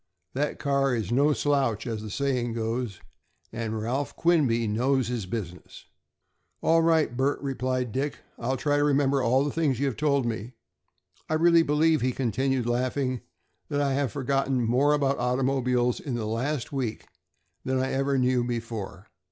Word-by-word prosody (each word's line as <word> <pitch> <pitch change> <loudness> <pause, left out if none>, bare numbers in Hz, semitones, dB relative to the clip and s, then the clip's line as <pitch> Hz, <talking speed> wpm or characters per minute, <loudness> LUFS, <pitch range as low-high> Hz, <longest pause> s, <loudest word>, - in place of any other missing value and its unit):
That 145 +3 -1
car 140 -2 +1
is 110 -4 -3
no 140 +5 +4
slouch, 135 -7 +1
as 115 -3 -3
the 110 - -7
saying 125 -1 -1
goes, 115 -2 -3 0.5
and 110 -1 -3
Ralph 125 +6 -2
Quinby 140 -10 +2
knows 125 +3 +1
his 115 -6 -3
business." 90 -4 -7 0.8
"All 165 +1 +4
right, 160 -6 +2
Bert," 135 +3 +1
replied 130 -2 -1
Dick, 140 +4 -2 0.2
"I'll 130 +3 -1
try 145 +1 +1
to 145 - +2
remember 140 -1 +2
all 130 +3 +3
the 145 - -1
things 145 -6 0
you 140 - +1
have 135 -4 -1
told 140 -4 +1
me. 115 +1 -4 0.8
I 155 - +1
really 170 +1 +5
believe," 155 +1 +2
he 125 +1 +1
continued, 130 +1 0
laughing, 125 +1 -1 0.5
"that 145 - -1
I 140 -1 +1
have 135 -3 0
forgotten 135 -1 0
more 130 +6 +3
about 140 -2 +1
automobiles 125 -1 +1
in 135 -4 -4
the 115 -2 -2
last 125 +6 -2
week 125 -5 -3 0.6
than 130 0 0
I 130 +1 0
ever 135 +1 +1
knew 125 -1 +2
before. 115 -5 -5
130 Hz, 165 wpm, -27 LUFS, 120-140 Hz, 0.8 s, really